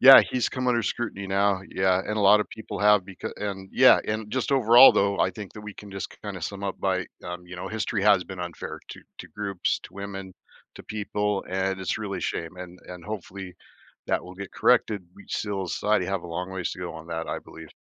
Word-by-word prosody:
Yeah. 135 +1 +11
He's 125 -1 +1
come 130 -1 -3
under 120 -2 +2
scrutiny 105 -3 -3
now. 100 0 +2
Yeah, 95 -1 +2
and 105 +3 -3
a - - +1
lotta 105 +1 +6
people 110 - -7
have 105 -1 +5
becau 95 -1 -7
and 95 -2 -5
yeah, - - +7
and 105 0 -3
just 130 0 -1
overall, 125 0 +8
though, 100 0 +2
I 95 - +3
think 100 +1 -9
that 105 - -9
we 105 -1 -8
can 105 - -11
just 95 -1 -5
k - - -15
kinda 100 -3 -5
sum 100 +4 -5
up 95 - -4
by, 95 -1 0 0.2
um 90 0 -6
you 90 - -9
know, 90 - -5
history 110 0 -2
has 100 -3 +5
been 95 -2 -8
unfair 85 -1 -6
to - - -9 0.2
to - - -9
groups, 100 -3 -2
to - - -11
women, 95 -1 -6 0.4
to - - -10
people, 105 -1 -2
and 95 +1 -1
it's 95 - -1
really 100 -3 -4
a - - -6
shame. 85 +2 -3
And 90 0 -9
and, 90 -1 -9
hopefully, 95 -3 -7 0.5
that - - +1
will 90 +1 -10
get 100 -1 -8
corrected. 100 -5 +2
We 100 - -15
still 100 -3 -2
society 105 -4 +1
have 95 -2 -2
a - - -8
long 90 +2 -4
ways 95 -2 -3
to - - -9
go 85 -2 -5
on 80 0 -9
that, 80 0 -4
I - - -2
believe. - - -12
100 Hz, 230 wpm, -26 LUFS, 90-105 Hz, 0.5 s, Yeah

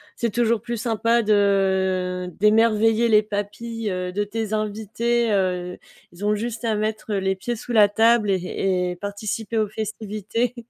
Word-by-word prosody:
c'est 235 - -1
toujours 235 -2 +1
plus 235 0 -4
sympa 230 +1 +1
de 190 -3 +1
d'émerveiller 225 +2 +3
les 215 -1 +5
papilles, 210 +2 -4
heu, 180 0 -3
de 205 +2 0
tes 215 +1 -4
invités, 220 +2 0
heu, 180 -2 -1 0.4
ils 175 +4 -10
ont 210 +1 +2
juste 230 +2 -4
à 225 -2 +1
mettre, 215 +1 -3
heu, 200 - +1
les 190 0 0
pieds 235 +5 -4
sous 240 - -6
la 210 -3 +6
table 225 +1 +3
et - - +3
et 180 0 -1
et - - -5
participer 205 +3 -4
aux 215 -1 +2
festivités 215 +2 -3
210 Hz, 170 wpm, -23 LUFS, 195-225 Hz, 0.4 s, la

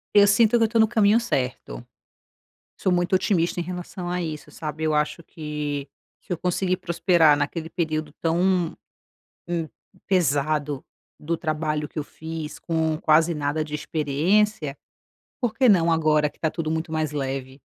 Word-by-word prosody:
Eu 205 0 +8
sinto 220 +3 +4
que 230 - +4
eu - - +2
tô 230 +1 +1
no 220 0 +5
caminho 220 0 +4
certo. 125 - -3 0.9
Sou 185 - +1
muito 175 +1 +1
otimista 180 -2 +1
em - - 0
relação 180 +1 -6
a 180 0 -1
isso 155 -2 -6
sabe 155 +1 -5
eu 155 -1 +1
acho 150 +2 0
que, 150 -3 -5 0.3
se - - -7
eu 175 - -2
consegui 180 +1 0
prosperar 170 -3 +3
naquele 155 +3 -2
período 155 -3 -2
tão, 175 +1 +1 0.7
hum, 170 -2 -2 0.4
pesado 145 -4 +1 0.4
do 165 +2 -2
trabalho 155 -2 -2
que - - -14
eu - - -2
fiz 160 0 -7
com 160 -2 0
quase 160 +1 +4
nada 150 0 -1
de 150 -1 -9
experiência, 155 +3 0 0.6
por 245 -4 0
que 260 +1 +4
não 170 -5 +4
agora 155 -2 +3
que - - -26
está 160 - 0
tudo 165 -2 -3
muito 160 +1 -2
mais 155 -2 -1
leve? 135 -2 -4
160 Hz, 160 wpm, -24 LUFS, 150-180 Hz, 0.9 s, Eu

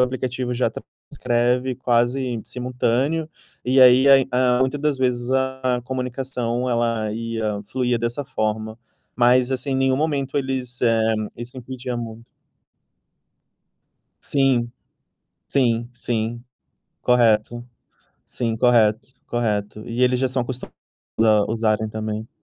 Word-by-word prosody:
o - - +6
aplicativo 125 -1 -3
já 125 +1 +1 0.4
transcreve 125 +1 0
quase 120 0 0
simultâneo, 125 +5 -1 0.4
e 130 +1 +3
aí, 130 +1 +7 0.3
a 125 0 +3
muitas 130 +2 0
das 150 -3 0
vezes, 125 -1 0
a 130 -1 0
comunicação, 125 -1 -3
ela 115 -3 0
ia 110 -2 -3
fluía 125 +1 0
dessa 120 +5 -2
forma. 110 -3 -3 0.4
Mas, 125 +1 +4
assim, 130 +1 -1
nenhum 130 0 +2
momento 145 -2 -1
eles 130 -2 -3
eh, 115 -2 +3 0.2
isso 120 +2 -7
incutia 125 0 -6
muito. 115 -1 -7 2.0
Sim, 130 -4 +1 0.8
sim, 120 -3 +1
sim. 120 0 -3 0.6
Correto, 120 -1 +2 0.6
sim, 115 -2 -2
correto, 115 0 +2
correto. 105 -3 -2
E 120 +2 0
eles 125 0 +3
já 130 - +2
são 130 0 -1
acostumados 125 0 -7 0.5
a 105 -2 +4
usarem 110 -1 0
também. 110 0 -4
125 Hz, 115 wpm, -22 LUFS, 115-130 Hz, 2.0 s, aí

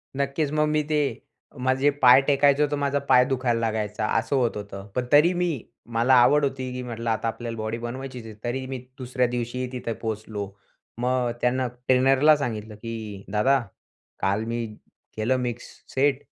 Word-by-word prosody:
नक्कीच. 140 +2 -1
मग 150 0 +2
मी 150 0 +1
ते 150 -1 +2 0.7
माझे 130 +2 +3
पाय 125 +2 +9
टेकायचं 140 +1 +4
होतं 145 0 0
माझा 140 0 0
पाय 125 0 +6
दुखायला 125 -3 0
लागायचा 110 -1 -1
असं 115 +5 -2
होत 120 -5 +1
होतं. 100 -1 -8
पण 125 -1 0
तरी 155 +5 +6
मी 175 -1 0 0.4
मला 120 +3 +4
आवड 145 +4 +5
होती 130 -2 -3
की 125 - -4
म्हटलं 115 -1 -4
आता 110 +1 0
आपल्याला 115 0 -4
बॉडी 110 +1 -3
बनवायचीच 125 0 -6
आहे 110 - -8
तरी 130 +2 -2
मी 130 -1 -4 0.2
दुसऱ्या 125 -1 0
दिवशीही 125 +1 -3
तिथे 120 -2 -4
पोहोचलो. 110 -2 -4 0.5
मग 125 -1 +1
त्यांना 125 +1 +1
ट्रेनरला 130 +4 +4
सांगितलं 110 -5 -4
की 110 -3 -7
"दादा 130 +6 +3 0.6
काल 100 +3 +1
मी 115 0 -2 0.5
केलं 115 +4 +1
मिक्स 120 -1 -3 0.3
सेट 135 0 +2
125 Hz, 165 wpm, -25 LUFS, 115-135 Hz, 0.7 s, पाय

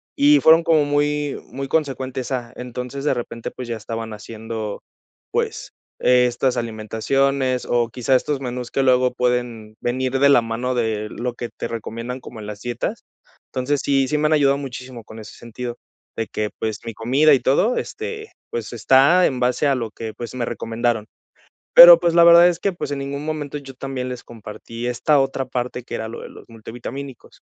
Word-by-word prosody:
y 295 +1 +5
fueron 165 +1 +6
como 160 -2 +3
muy 145 0 0
muy 135 0 -5
consecuentes 135 -3 -2
a 120 -3 -3
Entonces, 125 +3 -6
de 150 - +3
repente, 115 -2 -5
pues, 125 - -8
ya 115 - -2
estaban 115 +1 -6
haciendo, 110 0 -6 0.5
pues, - - -2 0.3
estas 125 0 +2
alimentaciones, 125 +4 0
o 120 -1 +1
quizá 125 +2 +1
estos 140 +2 0
menús 125 -2 -5
que 135 - +1
luego 125 -1 +3
pueden 120 -3 -2
venir 130 +2 -1
de 140 +1 +5
la 140 -4 +6
mano 120 +3 -2
de 110 -3 -1
lo 125 0 -4
que 120 0 -6
te - - -6
recomiendan 115 +2 -6
como 120 -3 -11
en 105 - -8
las 105 -1 -8
dietas. 120 +1 -4 0.5
Entonces, 135 +3 -1
sí, 135 -1 +2
sí 150 +3 0
me 150 - +2
han 155 - +2
ayudado 140 -2 +3
muchísimo 130 -3 -8
con 110 - -12
ese 110 - -11
sentido, 120 +1 -7 0.4
de 115 - -3
que 105 -1 -3
pues, 110 -1 -3
mi 115 - -5
comida 135 +8 +3
y 135 - +4
todo, 195 - +2
este, 440 0 -5 0.2
pues 115 -1 -5
está 135 - +5
en 130 - 0
base 125 +3 +1
a 140 - +3
lo 115 -3 -3
que 110 +1 -7
pues, 120 +3 -8
me 125 -2 -2
recomendaron. 115 -1 -2 0.7
Pero, 170 0 +11
pues 170 -1 +1
la 170 0 +7
verdad 170 +1 +8
es 175 -2 -1
que, 200 - -1
pues 175 - -5
en 145 - -3
ningún 140 +1 -5
momento 150 -2 -4
yo 135 -2 -11
también 130 -1 -5
les 125 -1 -7
compartí 115 +1 -8
esta 140 +4 +2
otra 135 0 -1
parte 125 -1 -4
que - - -8
era 110 - -4
lo 115 - -8
de - - -8
los - - -14
multivitamínicos. 120 +4 -9
125 Hz, 190 wpm, -21 LUFS, 115-140 Hz, 0.7 s, Pero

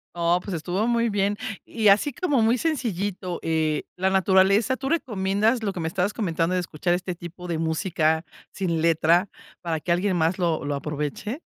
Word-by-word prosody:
No 170 +1 +2
pues 195 - -4
estuvo 180 +7 -1
muy 235 -1 +2
bien. 205 0 0 0.3
Y 220 -2 0
así 210 +8 +4
como 290 -5 +1
muy 225 +3 +3
sencillito, 205 - -2
eh, 155 -2 0
la 190 +1 +1
naturaleza, 190 +4 +3
¿tú 270 +1 -4
recomiendas 215 - +1
lo 200 - 0
que 190 - -7
me 160 - -2
estabas 185 +4 -1
comentando 170 -5 -1
de - - +2
escuchar 175 +1 -1
este 180 0 -4
tipo 175 +1 -9
de 170 - -2
música 160 -1 0 0.3
sin 170 -4 -1
letra 170 +3 +3 0.3
para 165 -2 -2
que 170 - -3
alguien 180 +2 +1
más 165 +3 +1
lo 165 -4 0
lo 145 - -1
aproveche? 150 - -4
185 Hz, 180 wpm, -24 LUFS, 165-205 Hz, 0.3 s, así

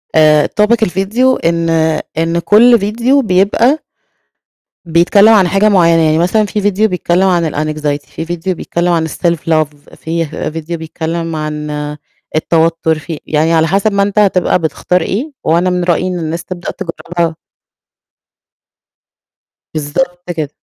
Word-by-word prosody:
آآ 155 -1 +5
topic 230 +2 +3
الفيديو 215 +7 +1
إن 165 0 0 0.5
إن 165 +1 0
كُل 230 +6 +5
فيديو 235 +7 +1
بيبقى 220 +7 +2 1.1
بيتكلم 175 +6 +4
عن 195 -4 +4
حاجة 195 +4 +2
معيّنة، 170 -4 +4
يعني 155 0 +2
مثلًا 185 +6 +2
في 210 +1 -3
فيديو 205 +2 +2
بيتكلم 180 0 +1
عن 170 -4 +1
الAnxiety 150 -1 -3
في 165 - -6
فيديو 175 +2 -3
بيتكلم 175 +1 -2
عن 160 -1 0
الSelf 170 +2 -1
love 150 -2 -2
فيه 165 +1 -3 0.2
فيديو 165 +2 -5
بيتكلم 165 +1 -4
عن 150 -1 -4 0.7
التوتر، 160 0 +1
في 155 0 -7
يعني 155 +2 +1
على 160 0 +3
حسب 195 +5 +1
ما 200 - +2
أنت 205 +1 0
هتبقى 185 -3 +2
بتختار 175 +3 -1
إيه، 240 - -3
وأنا 170 +3 +2
من 180 0 -1
رأيي 175 +1 +1
إن 180 -1 -3
الناس 165 +1 -4
تبدأ 180 -1 -6
تجربها. 170 -2 -4 2.4
بالضبط 175 +4 -3
كده. 155 -4 -3
170 Hz, 140 wpm, -14 LUFS, 160-195 Hz, 2.4 s, آآ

